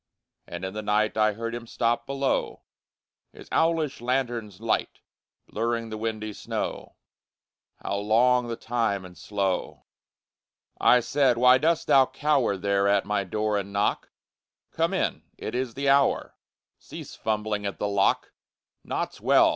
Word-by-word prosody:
And 85 +2 -6
in 95 - -5
the 110 - -4
night 105 +1 +1
I 110 -1 +3
heard 115 +2 -4
him 120 0 -6
stop 120 +1 0
below, 140 0 -1 0.7
His - - -13
owlish 160 -6 +1
lanthorn's 120 -6 -2
light - - -1 0.5
Blurring 115 0 -2
the 110 - -4
windy 110 -1 -3
snow - - -5 0.9
How 100 - -2
long 120 +4 +3
the 115 - -3
time 110 -5 -1
and 90 -1 -12
slow! 95 -2 -2 0.9
I 125 - +5
said, 130 0 +2
_Why 125 +1 +6
dost 165 +1 +2
thou 135 -1 +5
cower 140 -9 +1
There 100 +1 +1
at 100 -1 +3
my 105 -1 0
door 105 +2 -1
and 100 0 -6
knock? 100 +1 0 0.6
Come - - 0
in! - - -1 0.2
It - - -5
is 125 -2 -2
the 140 0 -2
hour! 140 0 +2 0.4
Cease - - -10
fumbling 105 -1 -2
at 100 - -5
the 105 - -1
lock! 100 -1 +1 0.5
Naught's - - -4
well! - - +5
110 Hz, 145 wpm, -26 LUFS, 100-125 Hz, 0.9 s, Why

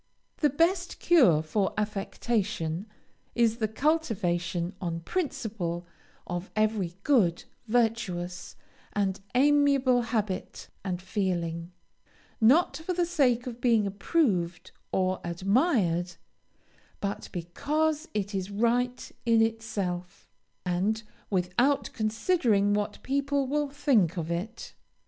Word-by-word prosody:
The 295 - +3
best 345 +5 +1
cure 205 - +5
for 190 +5 0
affectation 205 -4 -2 0.5
is 230 -1 +3
the 220 -2 0
cultivation, 190 - 0
on 170 -2 -3
principle, 220 - -3 0.4
of 175 +2 -4
every 215 -5 0
good, 200 - +3 0.2
virtuous, 215 -7 -1 0.4
and 200 -1 0 0.2
amiable 275 -2 +4
habit 215 -5 -3
and 180 -2 -2
feeling, 175 -3 -2 0.7
not 275 +6 +5
for 320 +4 -3
the 350 0 +1
sake 265 -8 +2
of 245 -1 -7
being 230 -4 +3
approved 195 - 0 0.2
or 185 0 0
admired, 180 - +1 0.8
but 200 0 -4
because 300 - -1
it 205 0 -2
is 190 0 -2
right 240 +4 0
in 230 -1 +4
itself, 200 -6 -3 0.3
and 195 +5 0 0.3
without 205 +9 +1
considering 215 - +2
what 205 0 -2
people 280 +1 0
will 290 +2 0
think 265 - +2
of 165 0 -3
it. 205 +7 -4
215 Hz, 105 wpm, -28 LUFS, 180-260 Hz, 0.8 s, cure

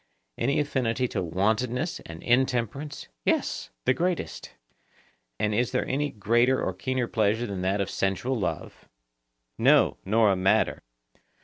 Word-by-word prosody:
Any 135 - +1
affinity 130 -4 0
to 95 - -2
wantonness 110 - 0
and 80 0 -9
intemperance? 130 +3 0 0.2
Yes, - - 0 0.2
the - - +4
greatest. 175 +4 -2 0.9
And 105 0 +1
is 120 +3 +1
there - - +1
any 145 +2 0
greater 120 +4 +2
or 95 - -1
keener 125 +6 -1
pleasure 110 +1 +1
than 100 -4 -4
that 95 +2 0
of 100 - 0
sensual 95 +7 -1
love? 95 - -4 0.7
No, - - +4
nor 110 +1 +3
a - - +2
madder. 95 +1 +2
115 Hz, 135 wpm, -27 LUFS, 100-130 Hz, 0.9 s, the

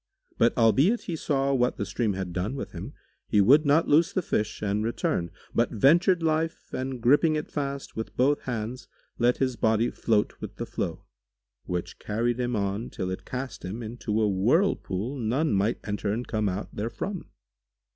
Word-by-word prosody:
But 115 +1 +3
albeit 135 - +4
he 170 - -4
saw 140 -3 0
what 125 -2 +1
the 100 - -2
stream 105 +2 -1
had 95 -2 -4
done 95 +9 -2
with 135 - -5
him, - - -7 0.3
he 105 - +3
would 140 +9 +6
not 150 +4 +4
loose 165 +5 +4
the 185 -3 -1
fish 110 -6 -2
and 105 +1 0
return, 100 -6 -1 0.2
but 115 - +2
ventured 170 - +4
life 160 0 -1
and 130 0 -3
gripping 145 +7 +4
it 150 - -4
fast 140 -2 -4
with 110 - -6
both 145 +3 +3
hands, 120 0 -4 0.3
let 120 +1 +3
his 130 -2 0
body 110 +1 +2
float 105 -3 +1
with - - -7
the - - -4
flow, - - -4 0.6
which 90 0 -4
carried 120 +3 -1
him 125 -1 0
on 100 +2 -2
till 95 0 -4
it 95 - -6
cast 125 -5 -5
him 105 +6 -5
into 110 -1 -2
a 110 - +3
whirlpool[FN#146] 115 - +1
none 140 +6 +1
might 100 +3 +1
enter 105 0 -2
and 120 +4 -3
come 110 -2 0
out 95 +3 -4
therefrom. 165 - -4
120 Hz, 180 wpm, -27 LUFS, 105-140 Hz, 0.6 s, would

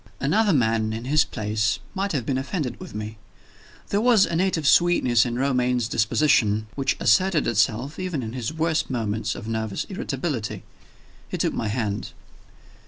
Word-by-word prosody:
Another 200 +10 +2
man, 110 -6 +1
in 115 +2 -5
his 150 +4 +4
place, 105 -2 -1 0.2
might 195 0 -2
have 135 -7 -2
been 130 0 0
offended 140 -1 -3
with - - -9
me. 105 0 -6 0.7
There 205 - +1
was 230 -4 +5
a 170 - -3
native 170 -4 +1
sweetness 130 -10 +4
in 120 0 -3
Romayne's 125 -3 +1
disposition, 110 -2 +2
which 135 -1 -1
asserted 185 -4 +3
itself 120 - 0
even 180 -8 -3
in 110 0 -5
his 125 +1 -3
worst 160 0 0
moments 110 -4 -2
of 110 - -8
nervous 110 -2 -2
irritability. 135 - -3 0.7
He - - -3
took - - 0
my 115 - -2
hand. 105 -2 -3
125 Hz, 160 wpm, -24 LUFS, 110-160 Hz, 0.7 s, was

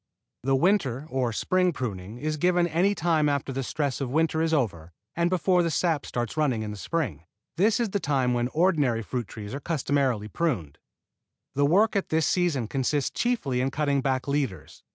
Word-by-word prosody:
The 135 +2 +2
winter 140 - +1
or 130 -3 0
spring 180 - +1
pruning 105 -5 -5
is 155 +4 -2
given 175 +2 +3
any 175 +5 +2
time 160 -4 +2
after 140 -1 -1
the 135 - -2
stress 140 +1 -2
of 135 - -2
winter 160 +3 +1
is 165 0 +1
over 90 - -1 0.2
and 170 +1 +2
before 180 0 +2
the 170 - +1
sap 160 -2 0
starts 120 -3 -3
running 135 -8 +1
in 105 - -4
the - - -6
spring. 105 - -3 0.3
This 205 +6 +3
is 230 -4 0
the 200 - 0
time 135 -6 +1
when 120 0 +1
the 125 - -4
ordinary 150 -9 +2
fruit 120 0 -4
trees 105 +1 -8
are 140 - -3
customarily 135 -8 0
pruned. 105 - -2 0.7
The 140 +1 +2
work 205 +8 +3
at 200 - 0
this 160 -1 +2
season 165 -10 +1
consists 135 +3 0
chiefly 155 - 0
in 130 - +1
cutting 140 -1 0
back 130 -1 -1
leaders. 130 - -3
140 Hz, 195 wpm, -26 LUFS, 125-170 Hz, 0.7 s, given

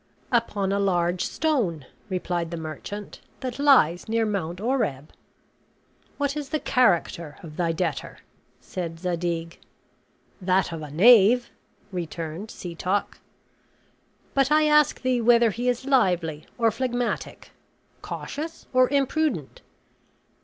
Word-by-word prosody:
"Upon 210 -5 +1
a 200 - +1
large 175 -2 +1
stone," 220 - -1 0.2
replied 175 -2 -2
the 170 - -5
merchant, 165 +6 -7 0.2
"that 255 -1 -5
lies 220 - +4
near 225 0 +2
Mount 185 -5 -3
Oreb." 205 - -1 1.0
"What 285 0 -1
is 295 -2 -5
the 310 0 -1
character 170 - +1
of 155 -2 -10
thy 170 -1 0
debtor?" 160 -5 -3 0.4
said 165 -2 -6
Zadig. 170 -1 -3 0.8
"That 185 0 +2
of 165 -1 -5
a 150 - -7
knave," 230 - +6 0.4
returned 170 +1 -5
Setoc. 180 +2 -3 1.1
"But 275 +1 +2
I 310 0 +5
ask 300 -1 +4
thee 255 -2 +1
whether 235 -1 +5
he 245 +4 -1
is 245 +1 -2
lively 180 - +1
or 230 -2 +3
phlegmatic, 245 +1 -3 0.5
cautious 320 +3 -6
or 255 0 +5
imprudent?" 280 - 0
200 Hz, 115 wpm, -25 LUFS, 170-250 Hz, 1.1 s, knave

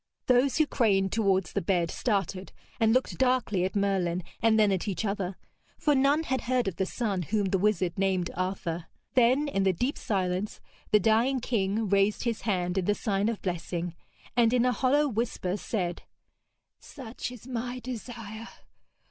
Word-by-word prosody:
Those 250 +2 +3
who 310 - +4
craned 195 -8 +2
towards 195 -6 +1
the - - 0
bed 170 -1 +1
started 195 -4 -2 0.3
and 225 -1 +4
looked 255 +2 +1
darkly 250 -8 +2
at 190 - -4
Merlin 185 -3 0 0.2
and 220 -1 +4
then 210 -2 +4
at 190 +2 -1
each 200 +2 -2
other; 195 -2 -2 0.4
for 300 - +2
none 280 +3 +3
had 260 -4 -1
heard 250 -2 0
of 190 - -3
the 190 - 0
son 205 -6 -1
whom 200 +2 0
the 195 - +2
wizard 185 -4 +1
named 190 -3 +1
Arthur. 175 -2 -3 0.3
Then 260 +3 +4
in 195 -9 0
the 190 -1 +3
deep 245 - -2
silence 190 0 -1 0.3
the 210 - +5
dying 225 +6 +3
king 220 -2 0
raised 200 +1 +2
his 235 -3 -1
hand 180 -3 0
in 180 - -2
the 205 - +2
sign 205 0 0
of 230 - -4
blessing, 175 -1 -3 0.4
and 235 -1 +4
in 250 -1 +3
a 250 - +3
hollow 280 +4 +2
whisper 220 -6 -2
said: 180 -5 -3 0.8
'Such 245 -3 -7
is 245 -2 -11
my 245 0 -4
desire. 230 -2 -7
210 Hz, 175 wpm, -28 LUFS, 190-245 Hz, 0.8 s, the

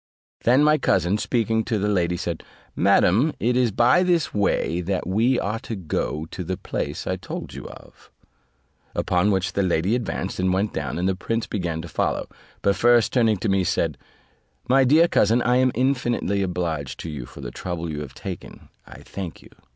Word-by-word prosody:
Then 130 +5 +5
my 150 0 +4
cousin, 95 +5 +2
speaking 110 -2 0
to 115 - 0
the 105 +1 0
lady, 90 -4 +1
said, 85 -2 -4 0.3
"Madam, 100 - +3
it 120 +2 +1
is 125 -1 +3
by 120 - +4
this 175 -4 +1
way 95 -4 +1
that 90 +1 -2
we 115 +7 +2
are 105 +3 -2
to 115 -2 -6
go 80 -3 -3
to 90 - -5
the 95 +2 -3
place - - -4
I - - -1
told - - -7
you - - -8
of:" - - -15 0.9
upon 90 +3 +1
which 95 -2 0
the 100 - +1
lady 90 +2 +1
advanced, 120 -5 -2
and 95 0 +2
went 100 +3 0
down, - - -3
and 90 +2 0
the 95 - +2
prince 115 +5 -2
began 85 -5 -3
to - - -7
follow; - - -1 0.4
but 100 - +3
first 120 +2 +4
turning 115 -4 +3
to 100 - -3
me, 95 -1 +2
said, 80 -3 0 0.7
"My 135 +2 +5
dear 155 +6 +5
cousin, 115 -5 +3
I 125 0 +3
am 130 0 +3
infinitely 125 -6 0
obliged 80 -7 -3
to 85 - -6
you 65 -5 -6
for 70 - -11
the - - -6
trouble 85 +4 -4
you 75 -2 -4
have 70 -3 -8
taken; - - -8 0.2
I - - -12
thank 95 -4 -7
you. - - -16
100 Hz, 195 wpm, -23 LUFS, 90-120 Hz, 0.9 s, Then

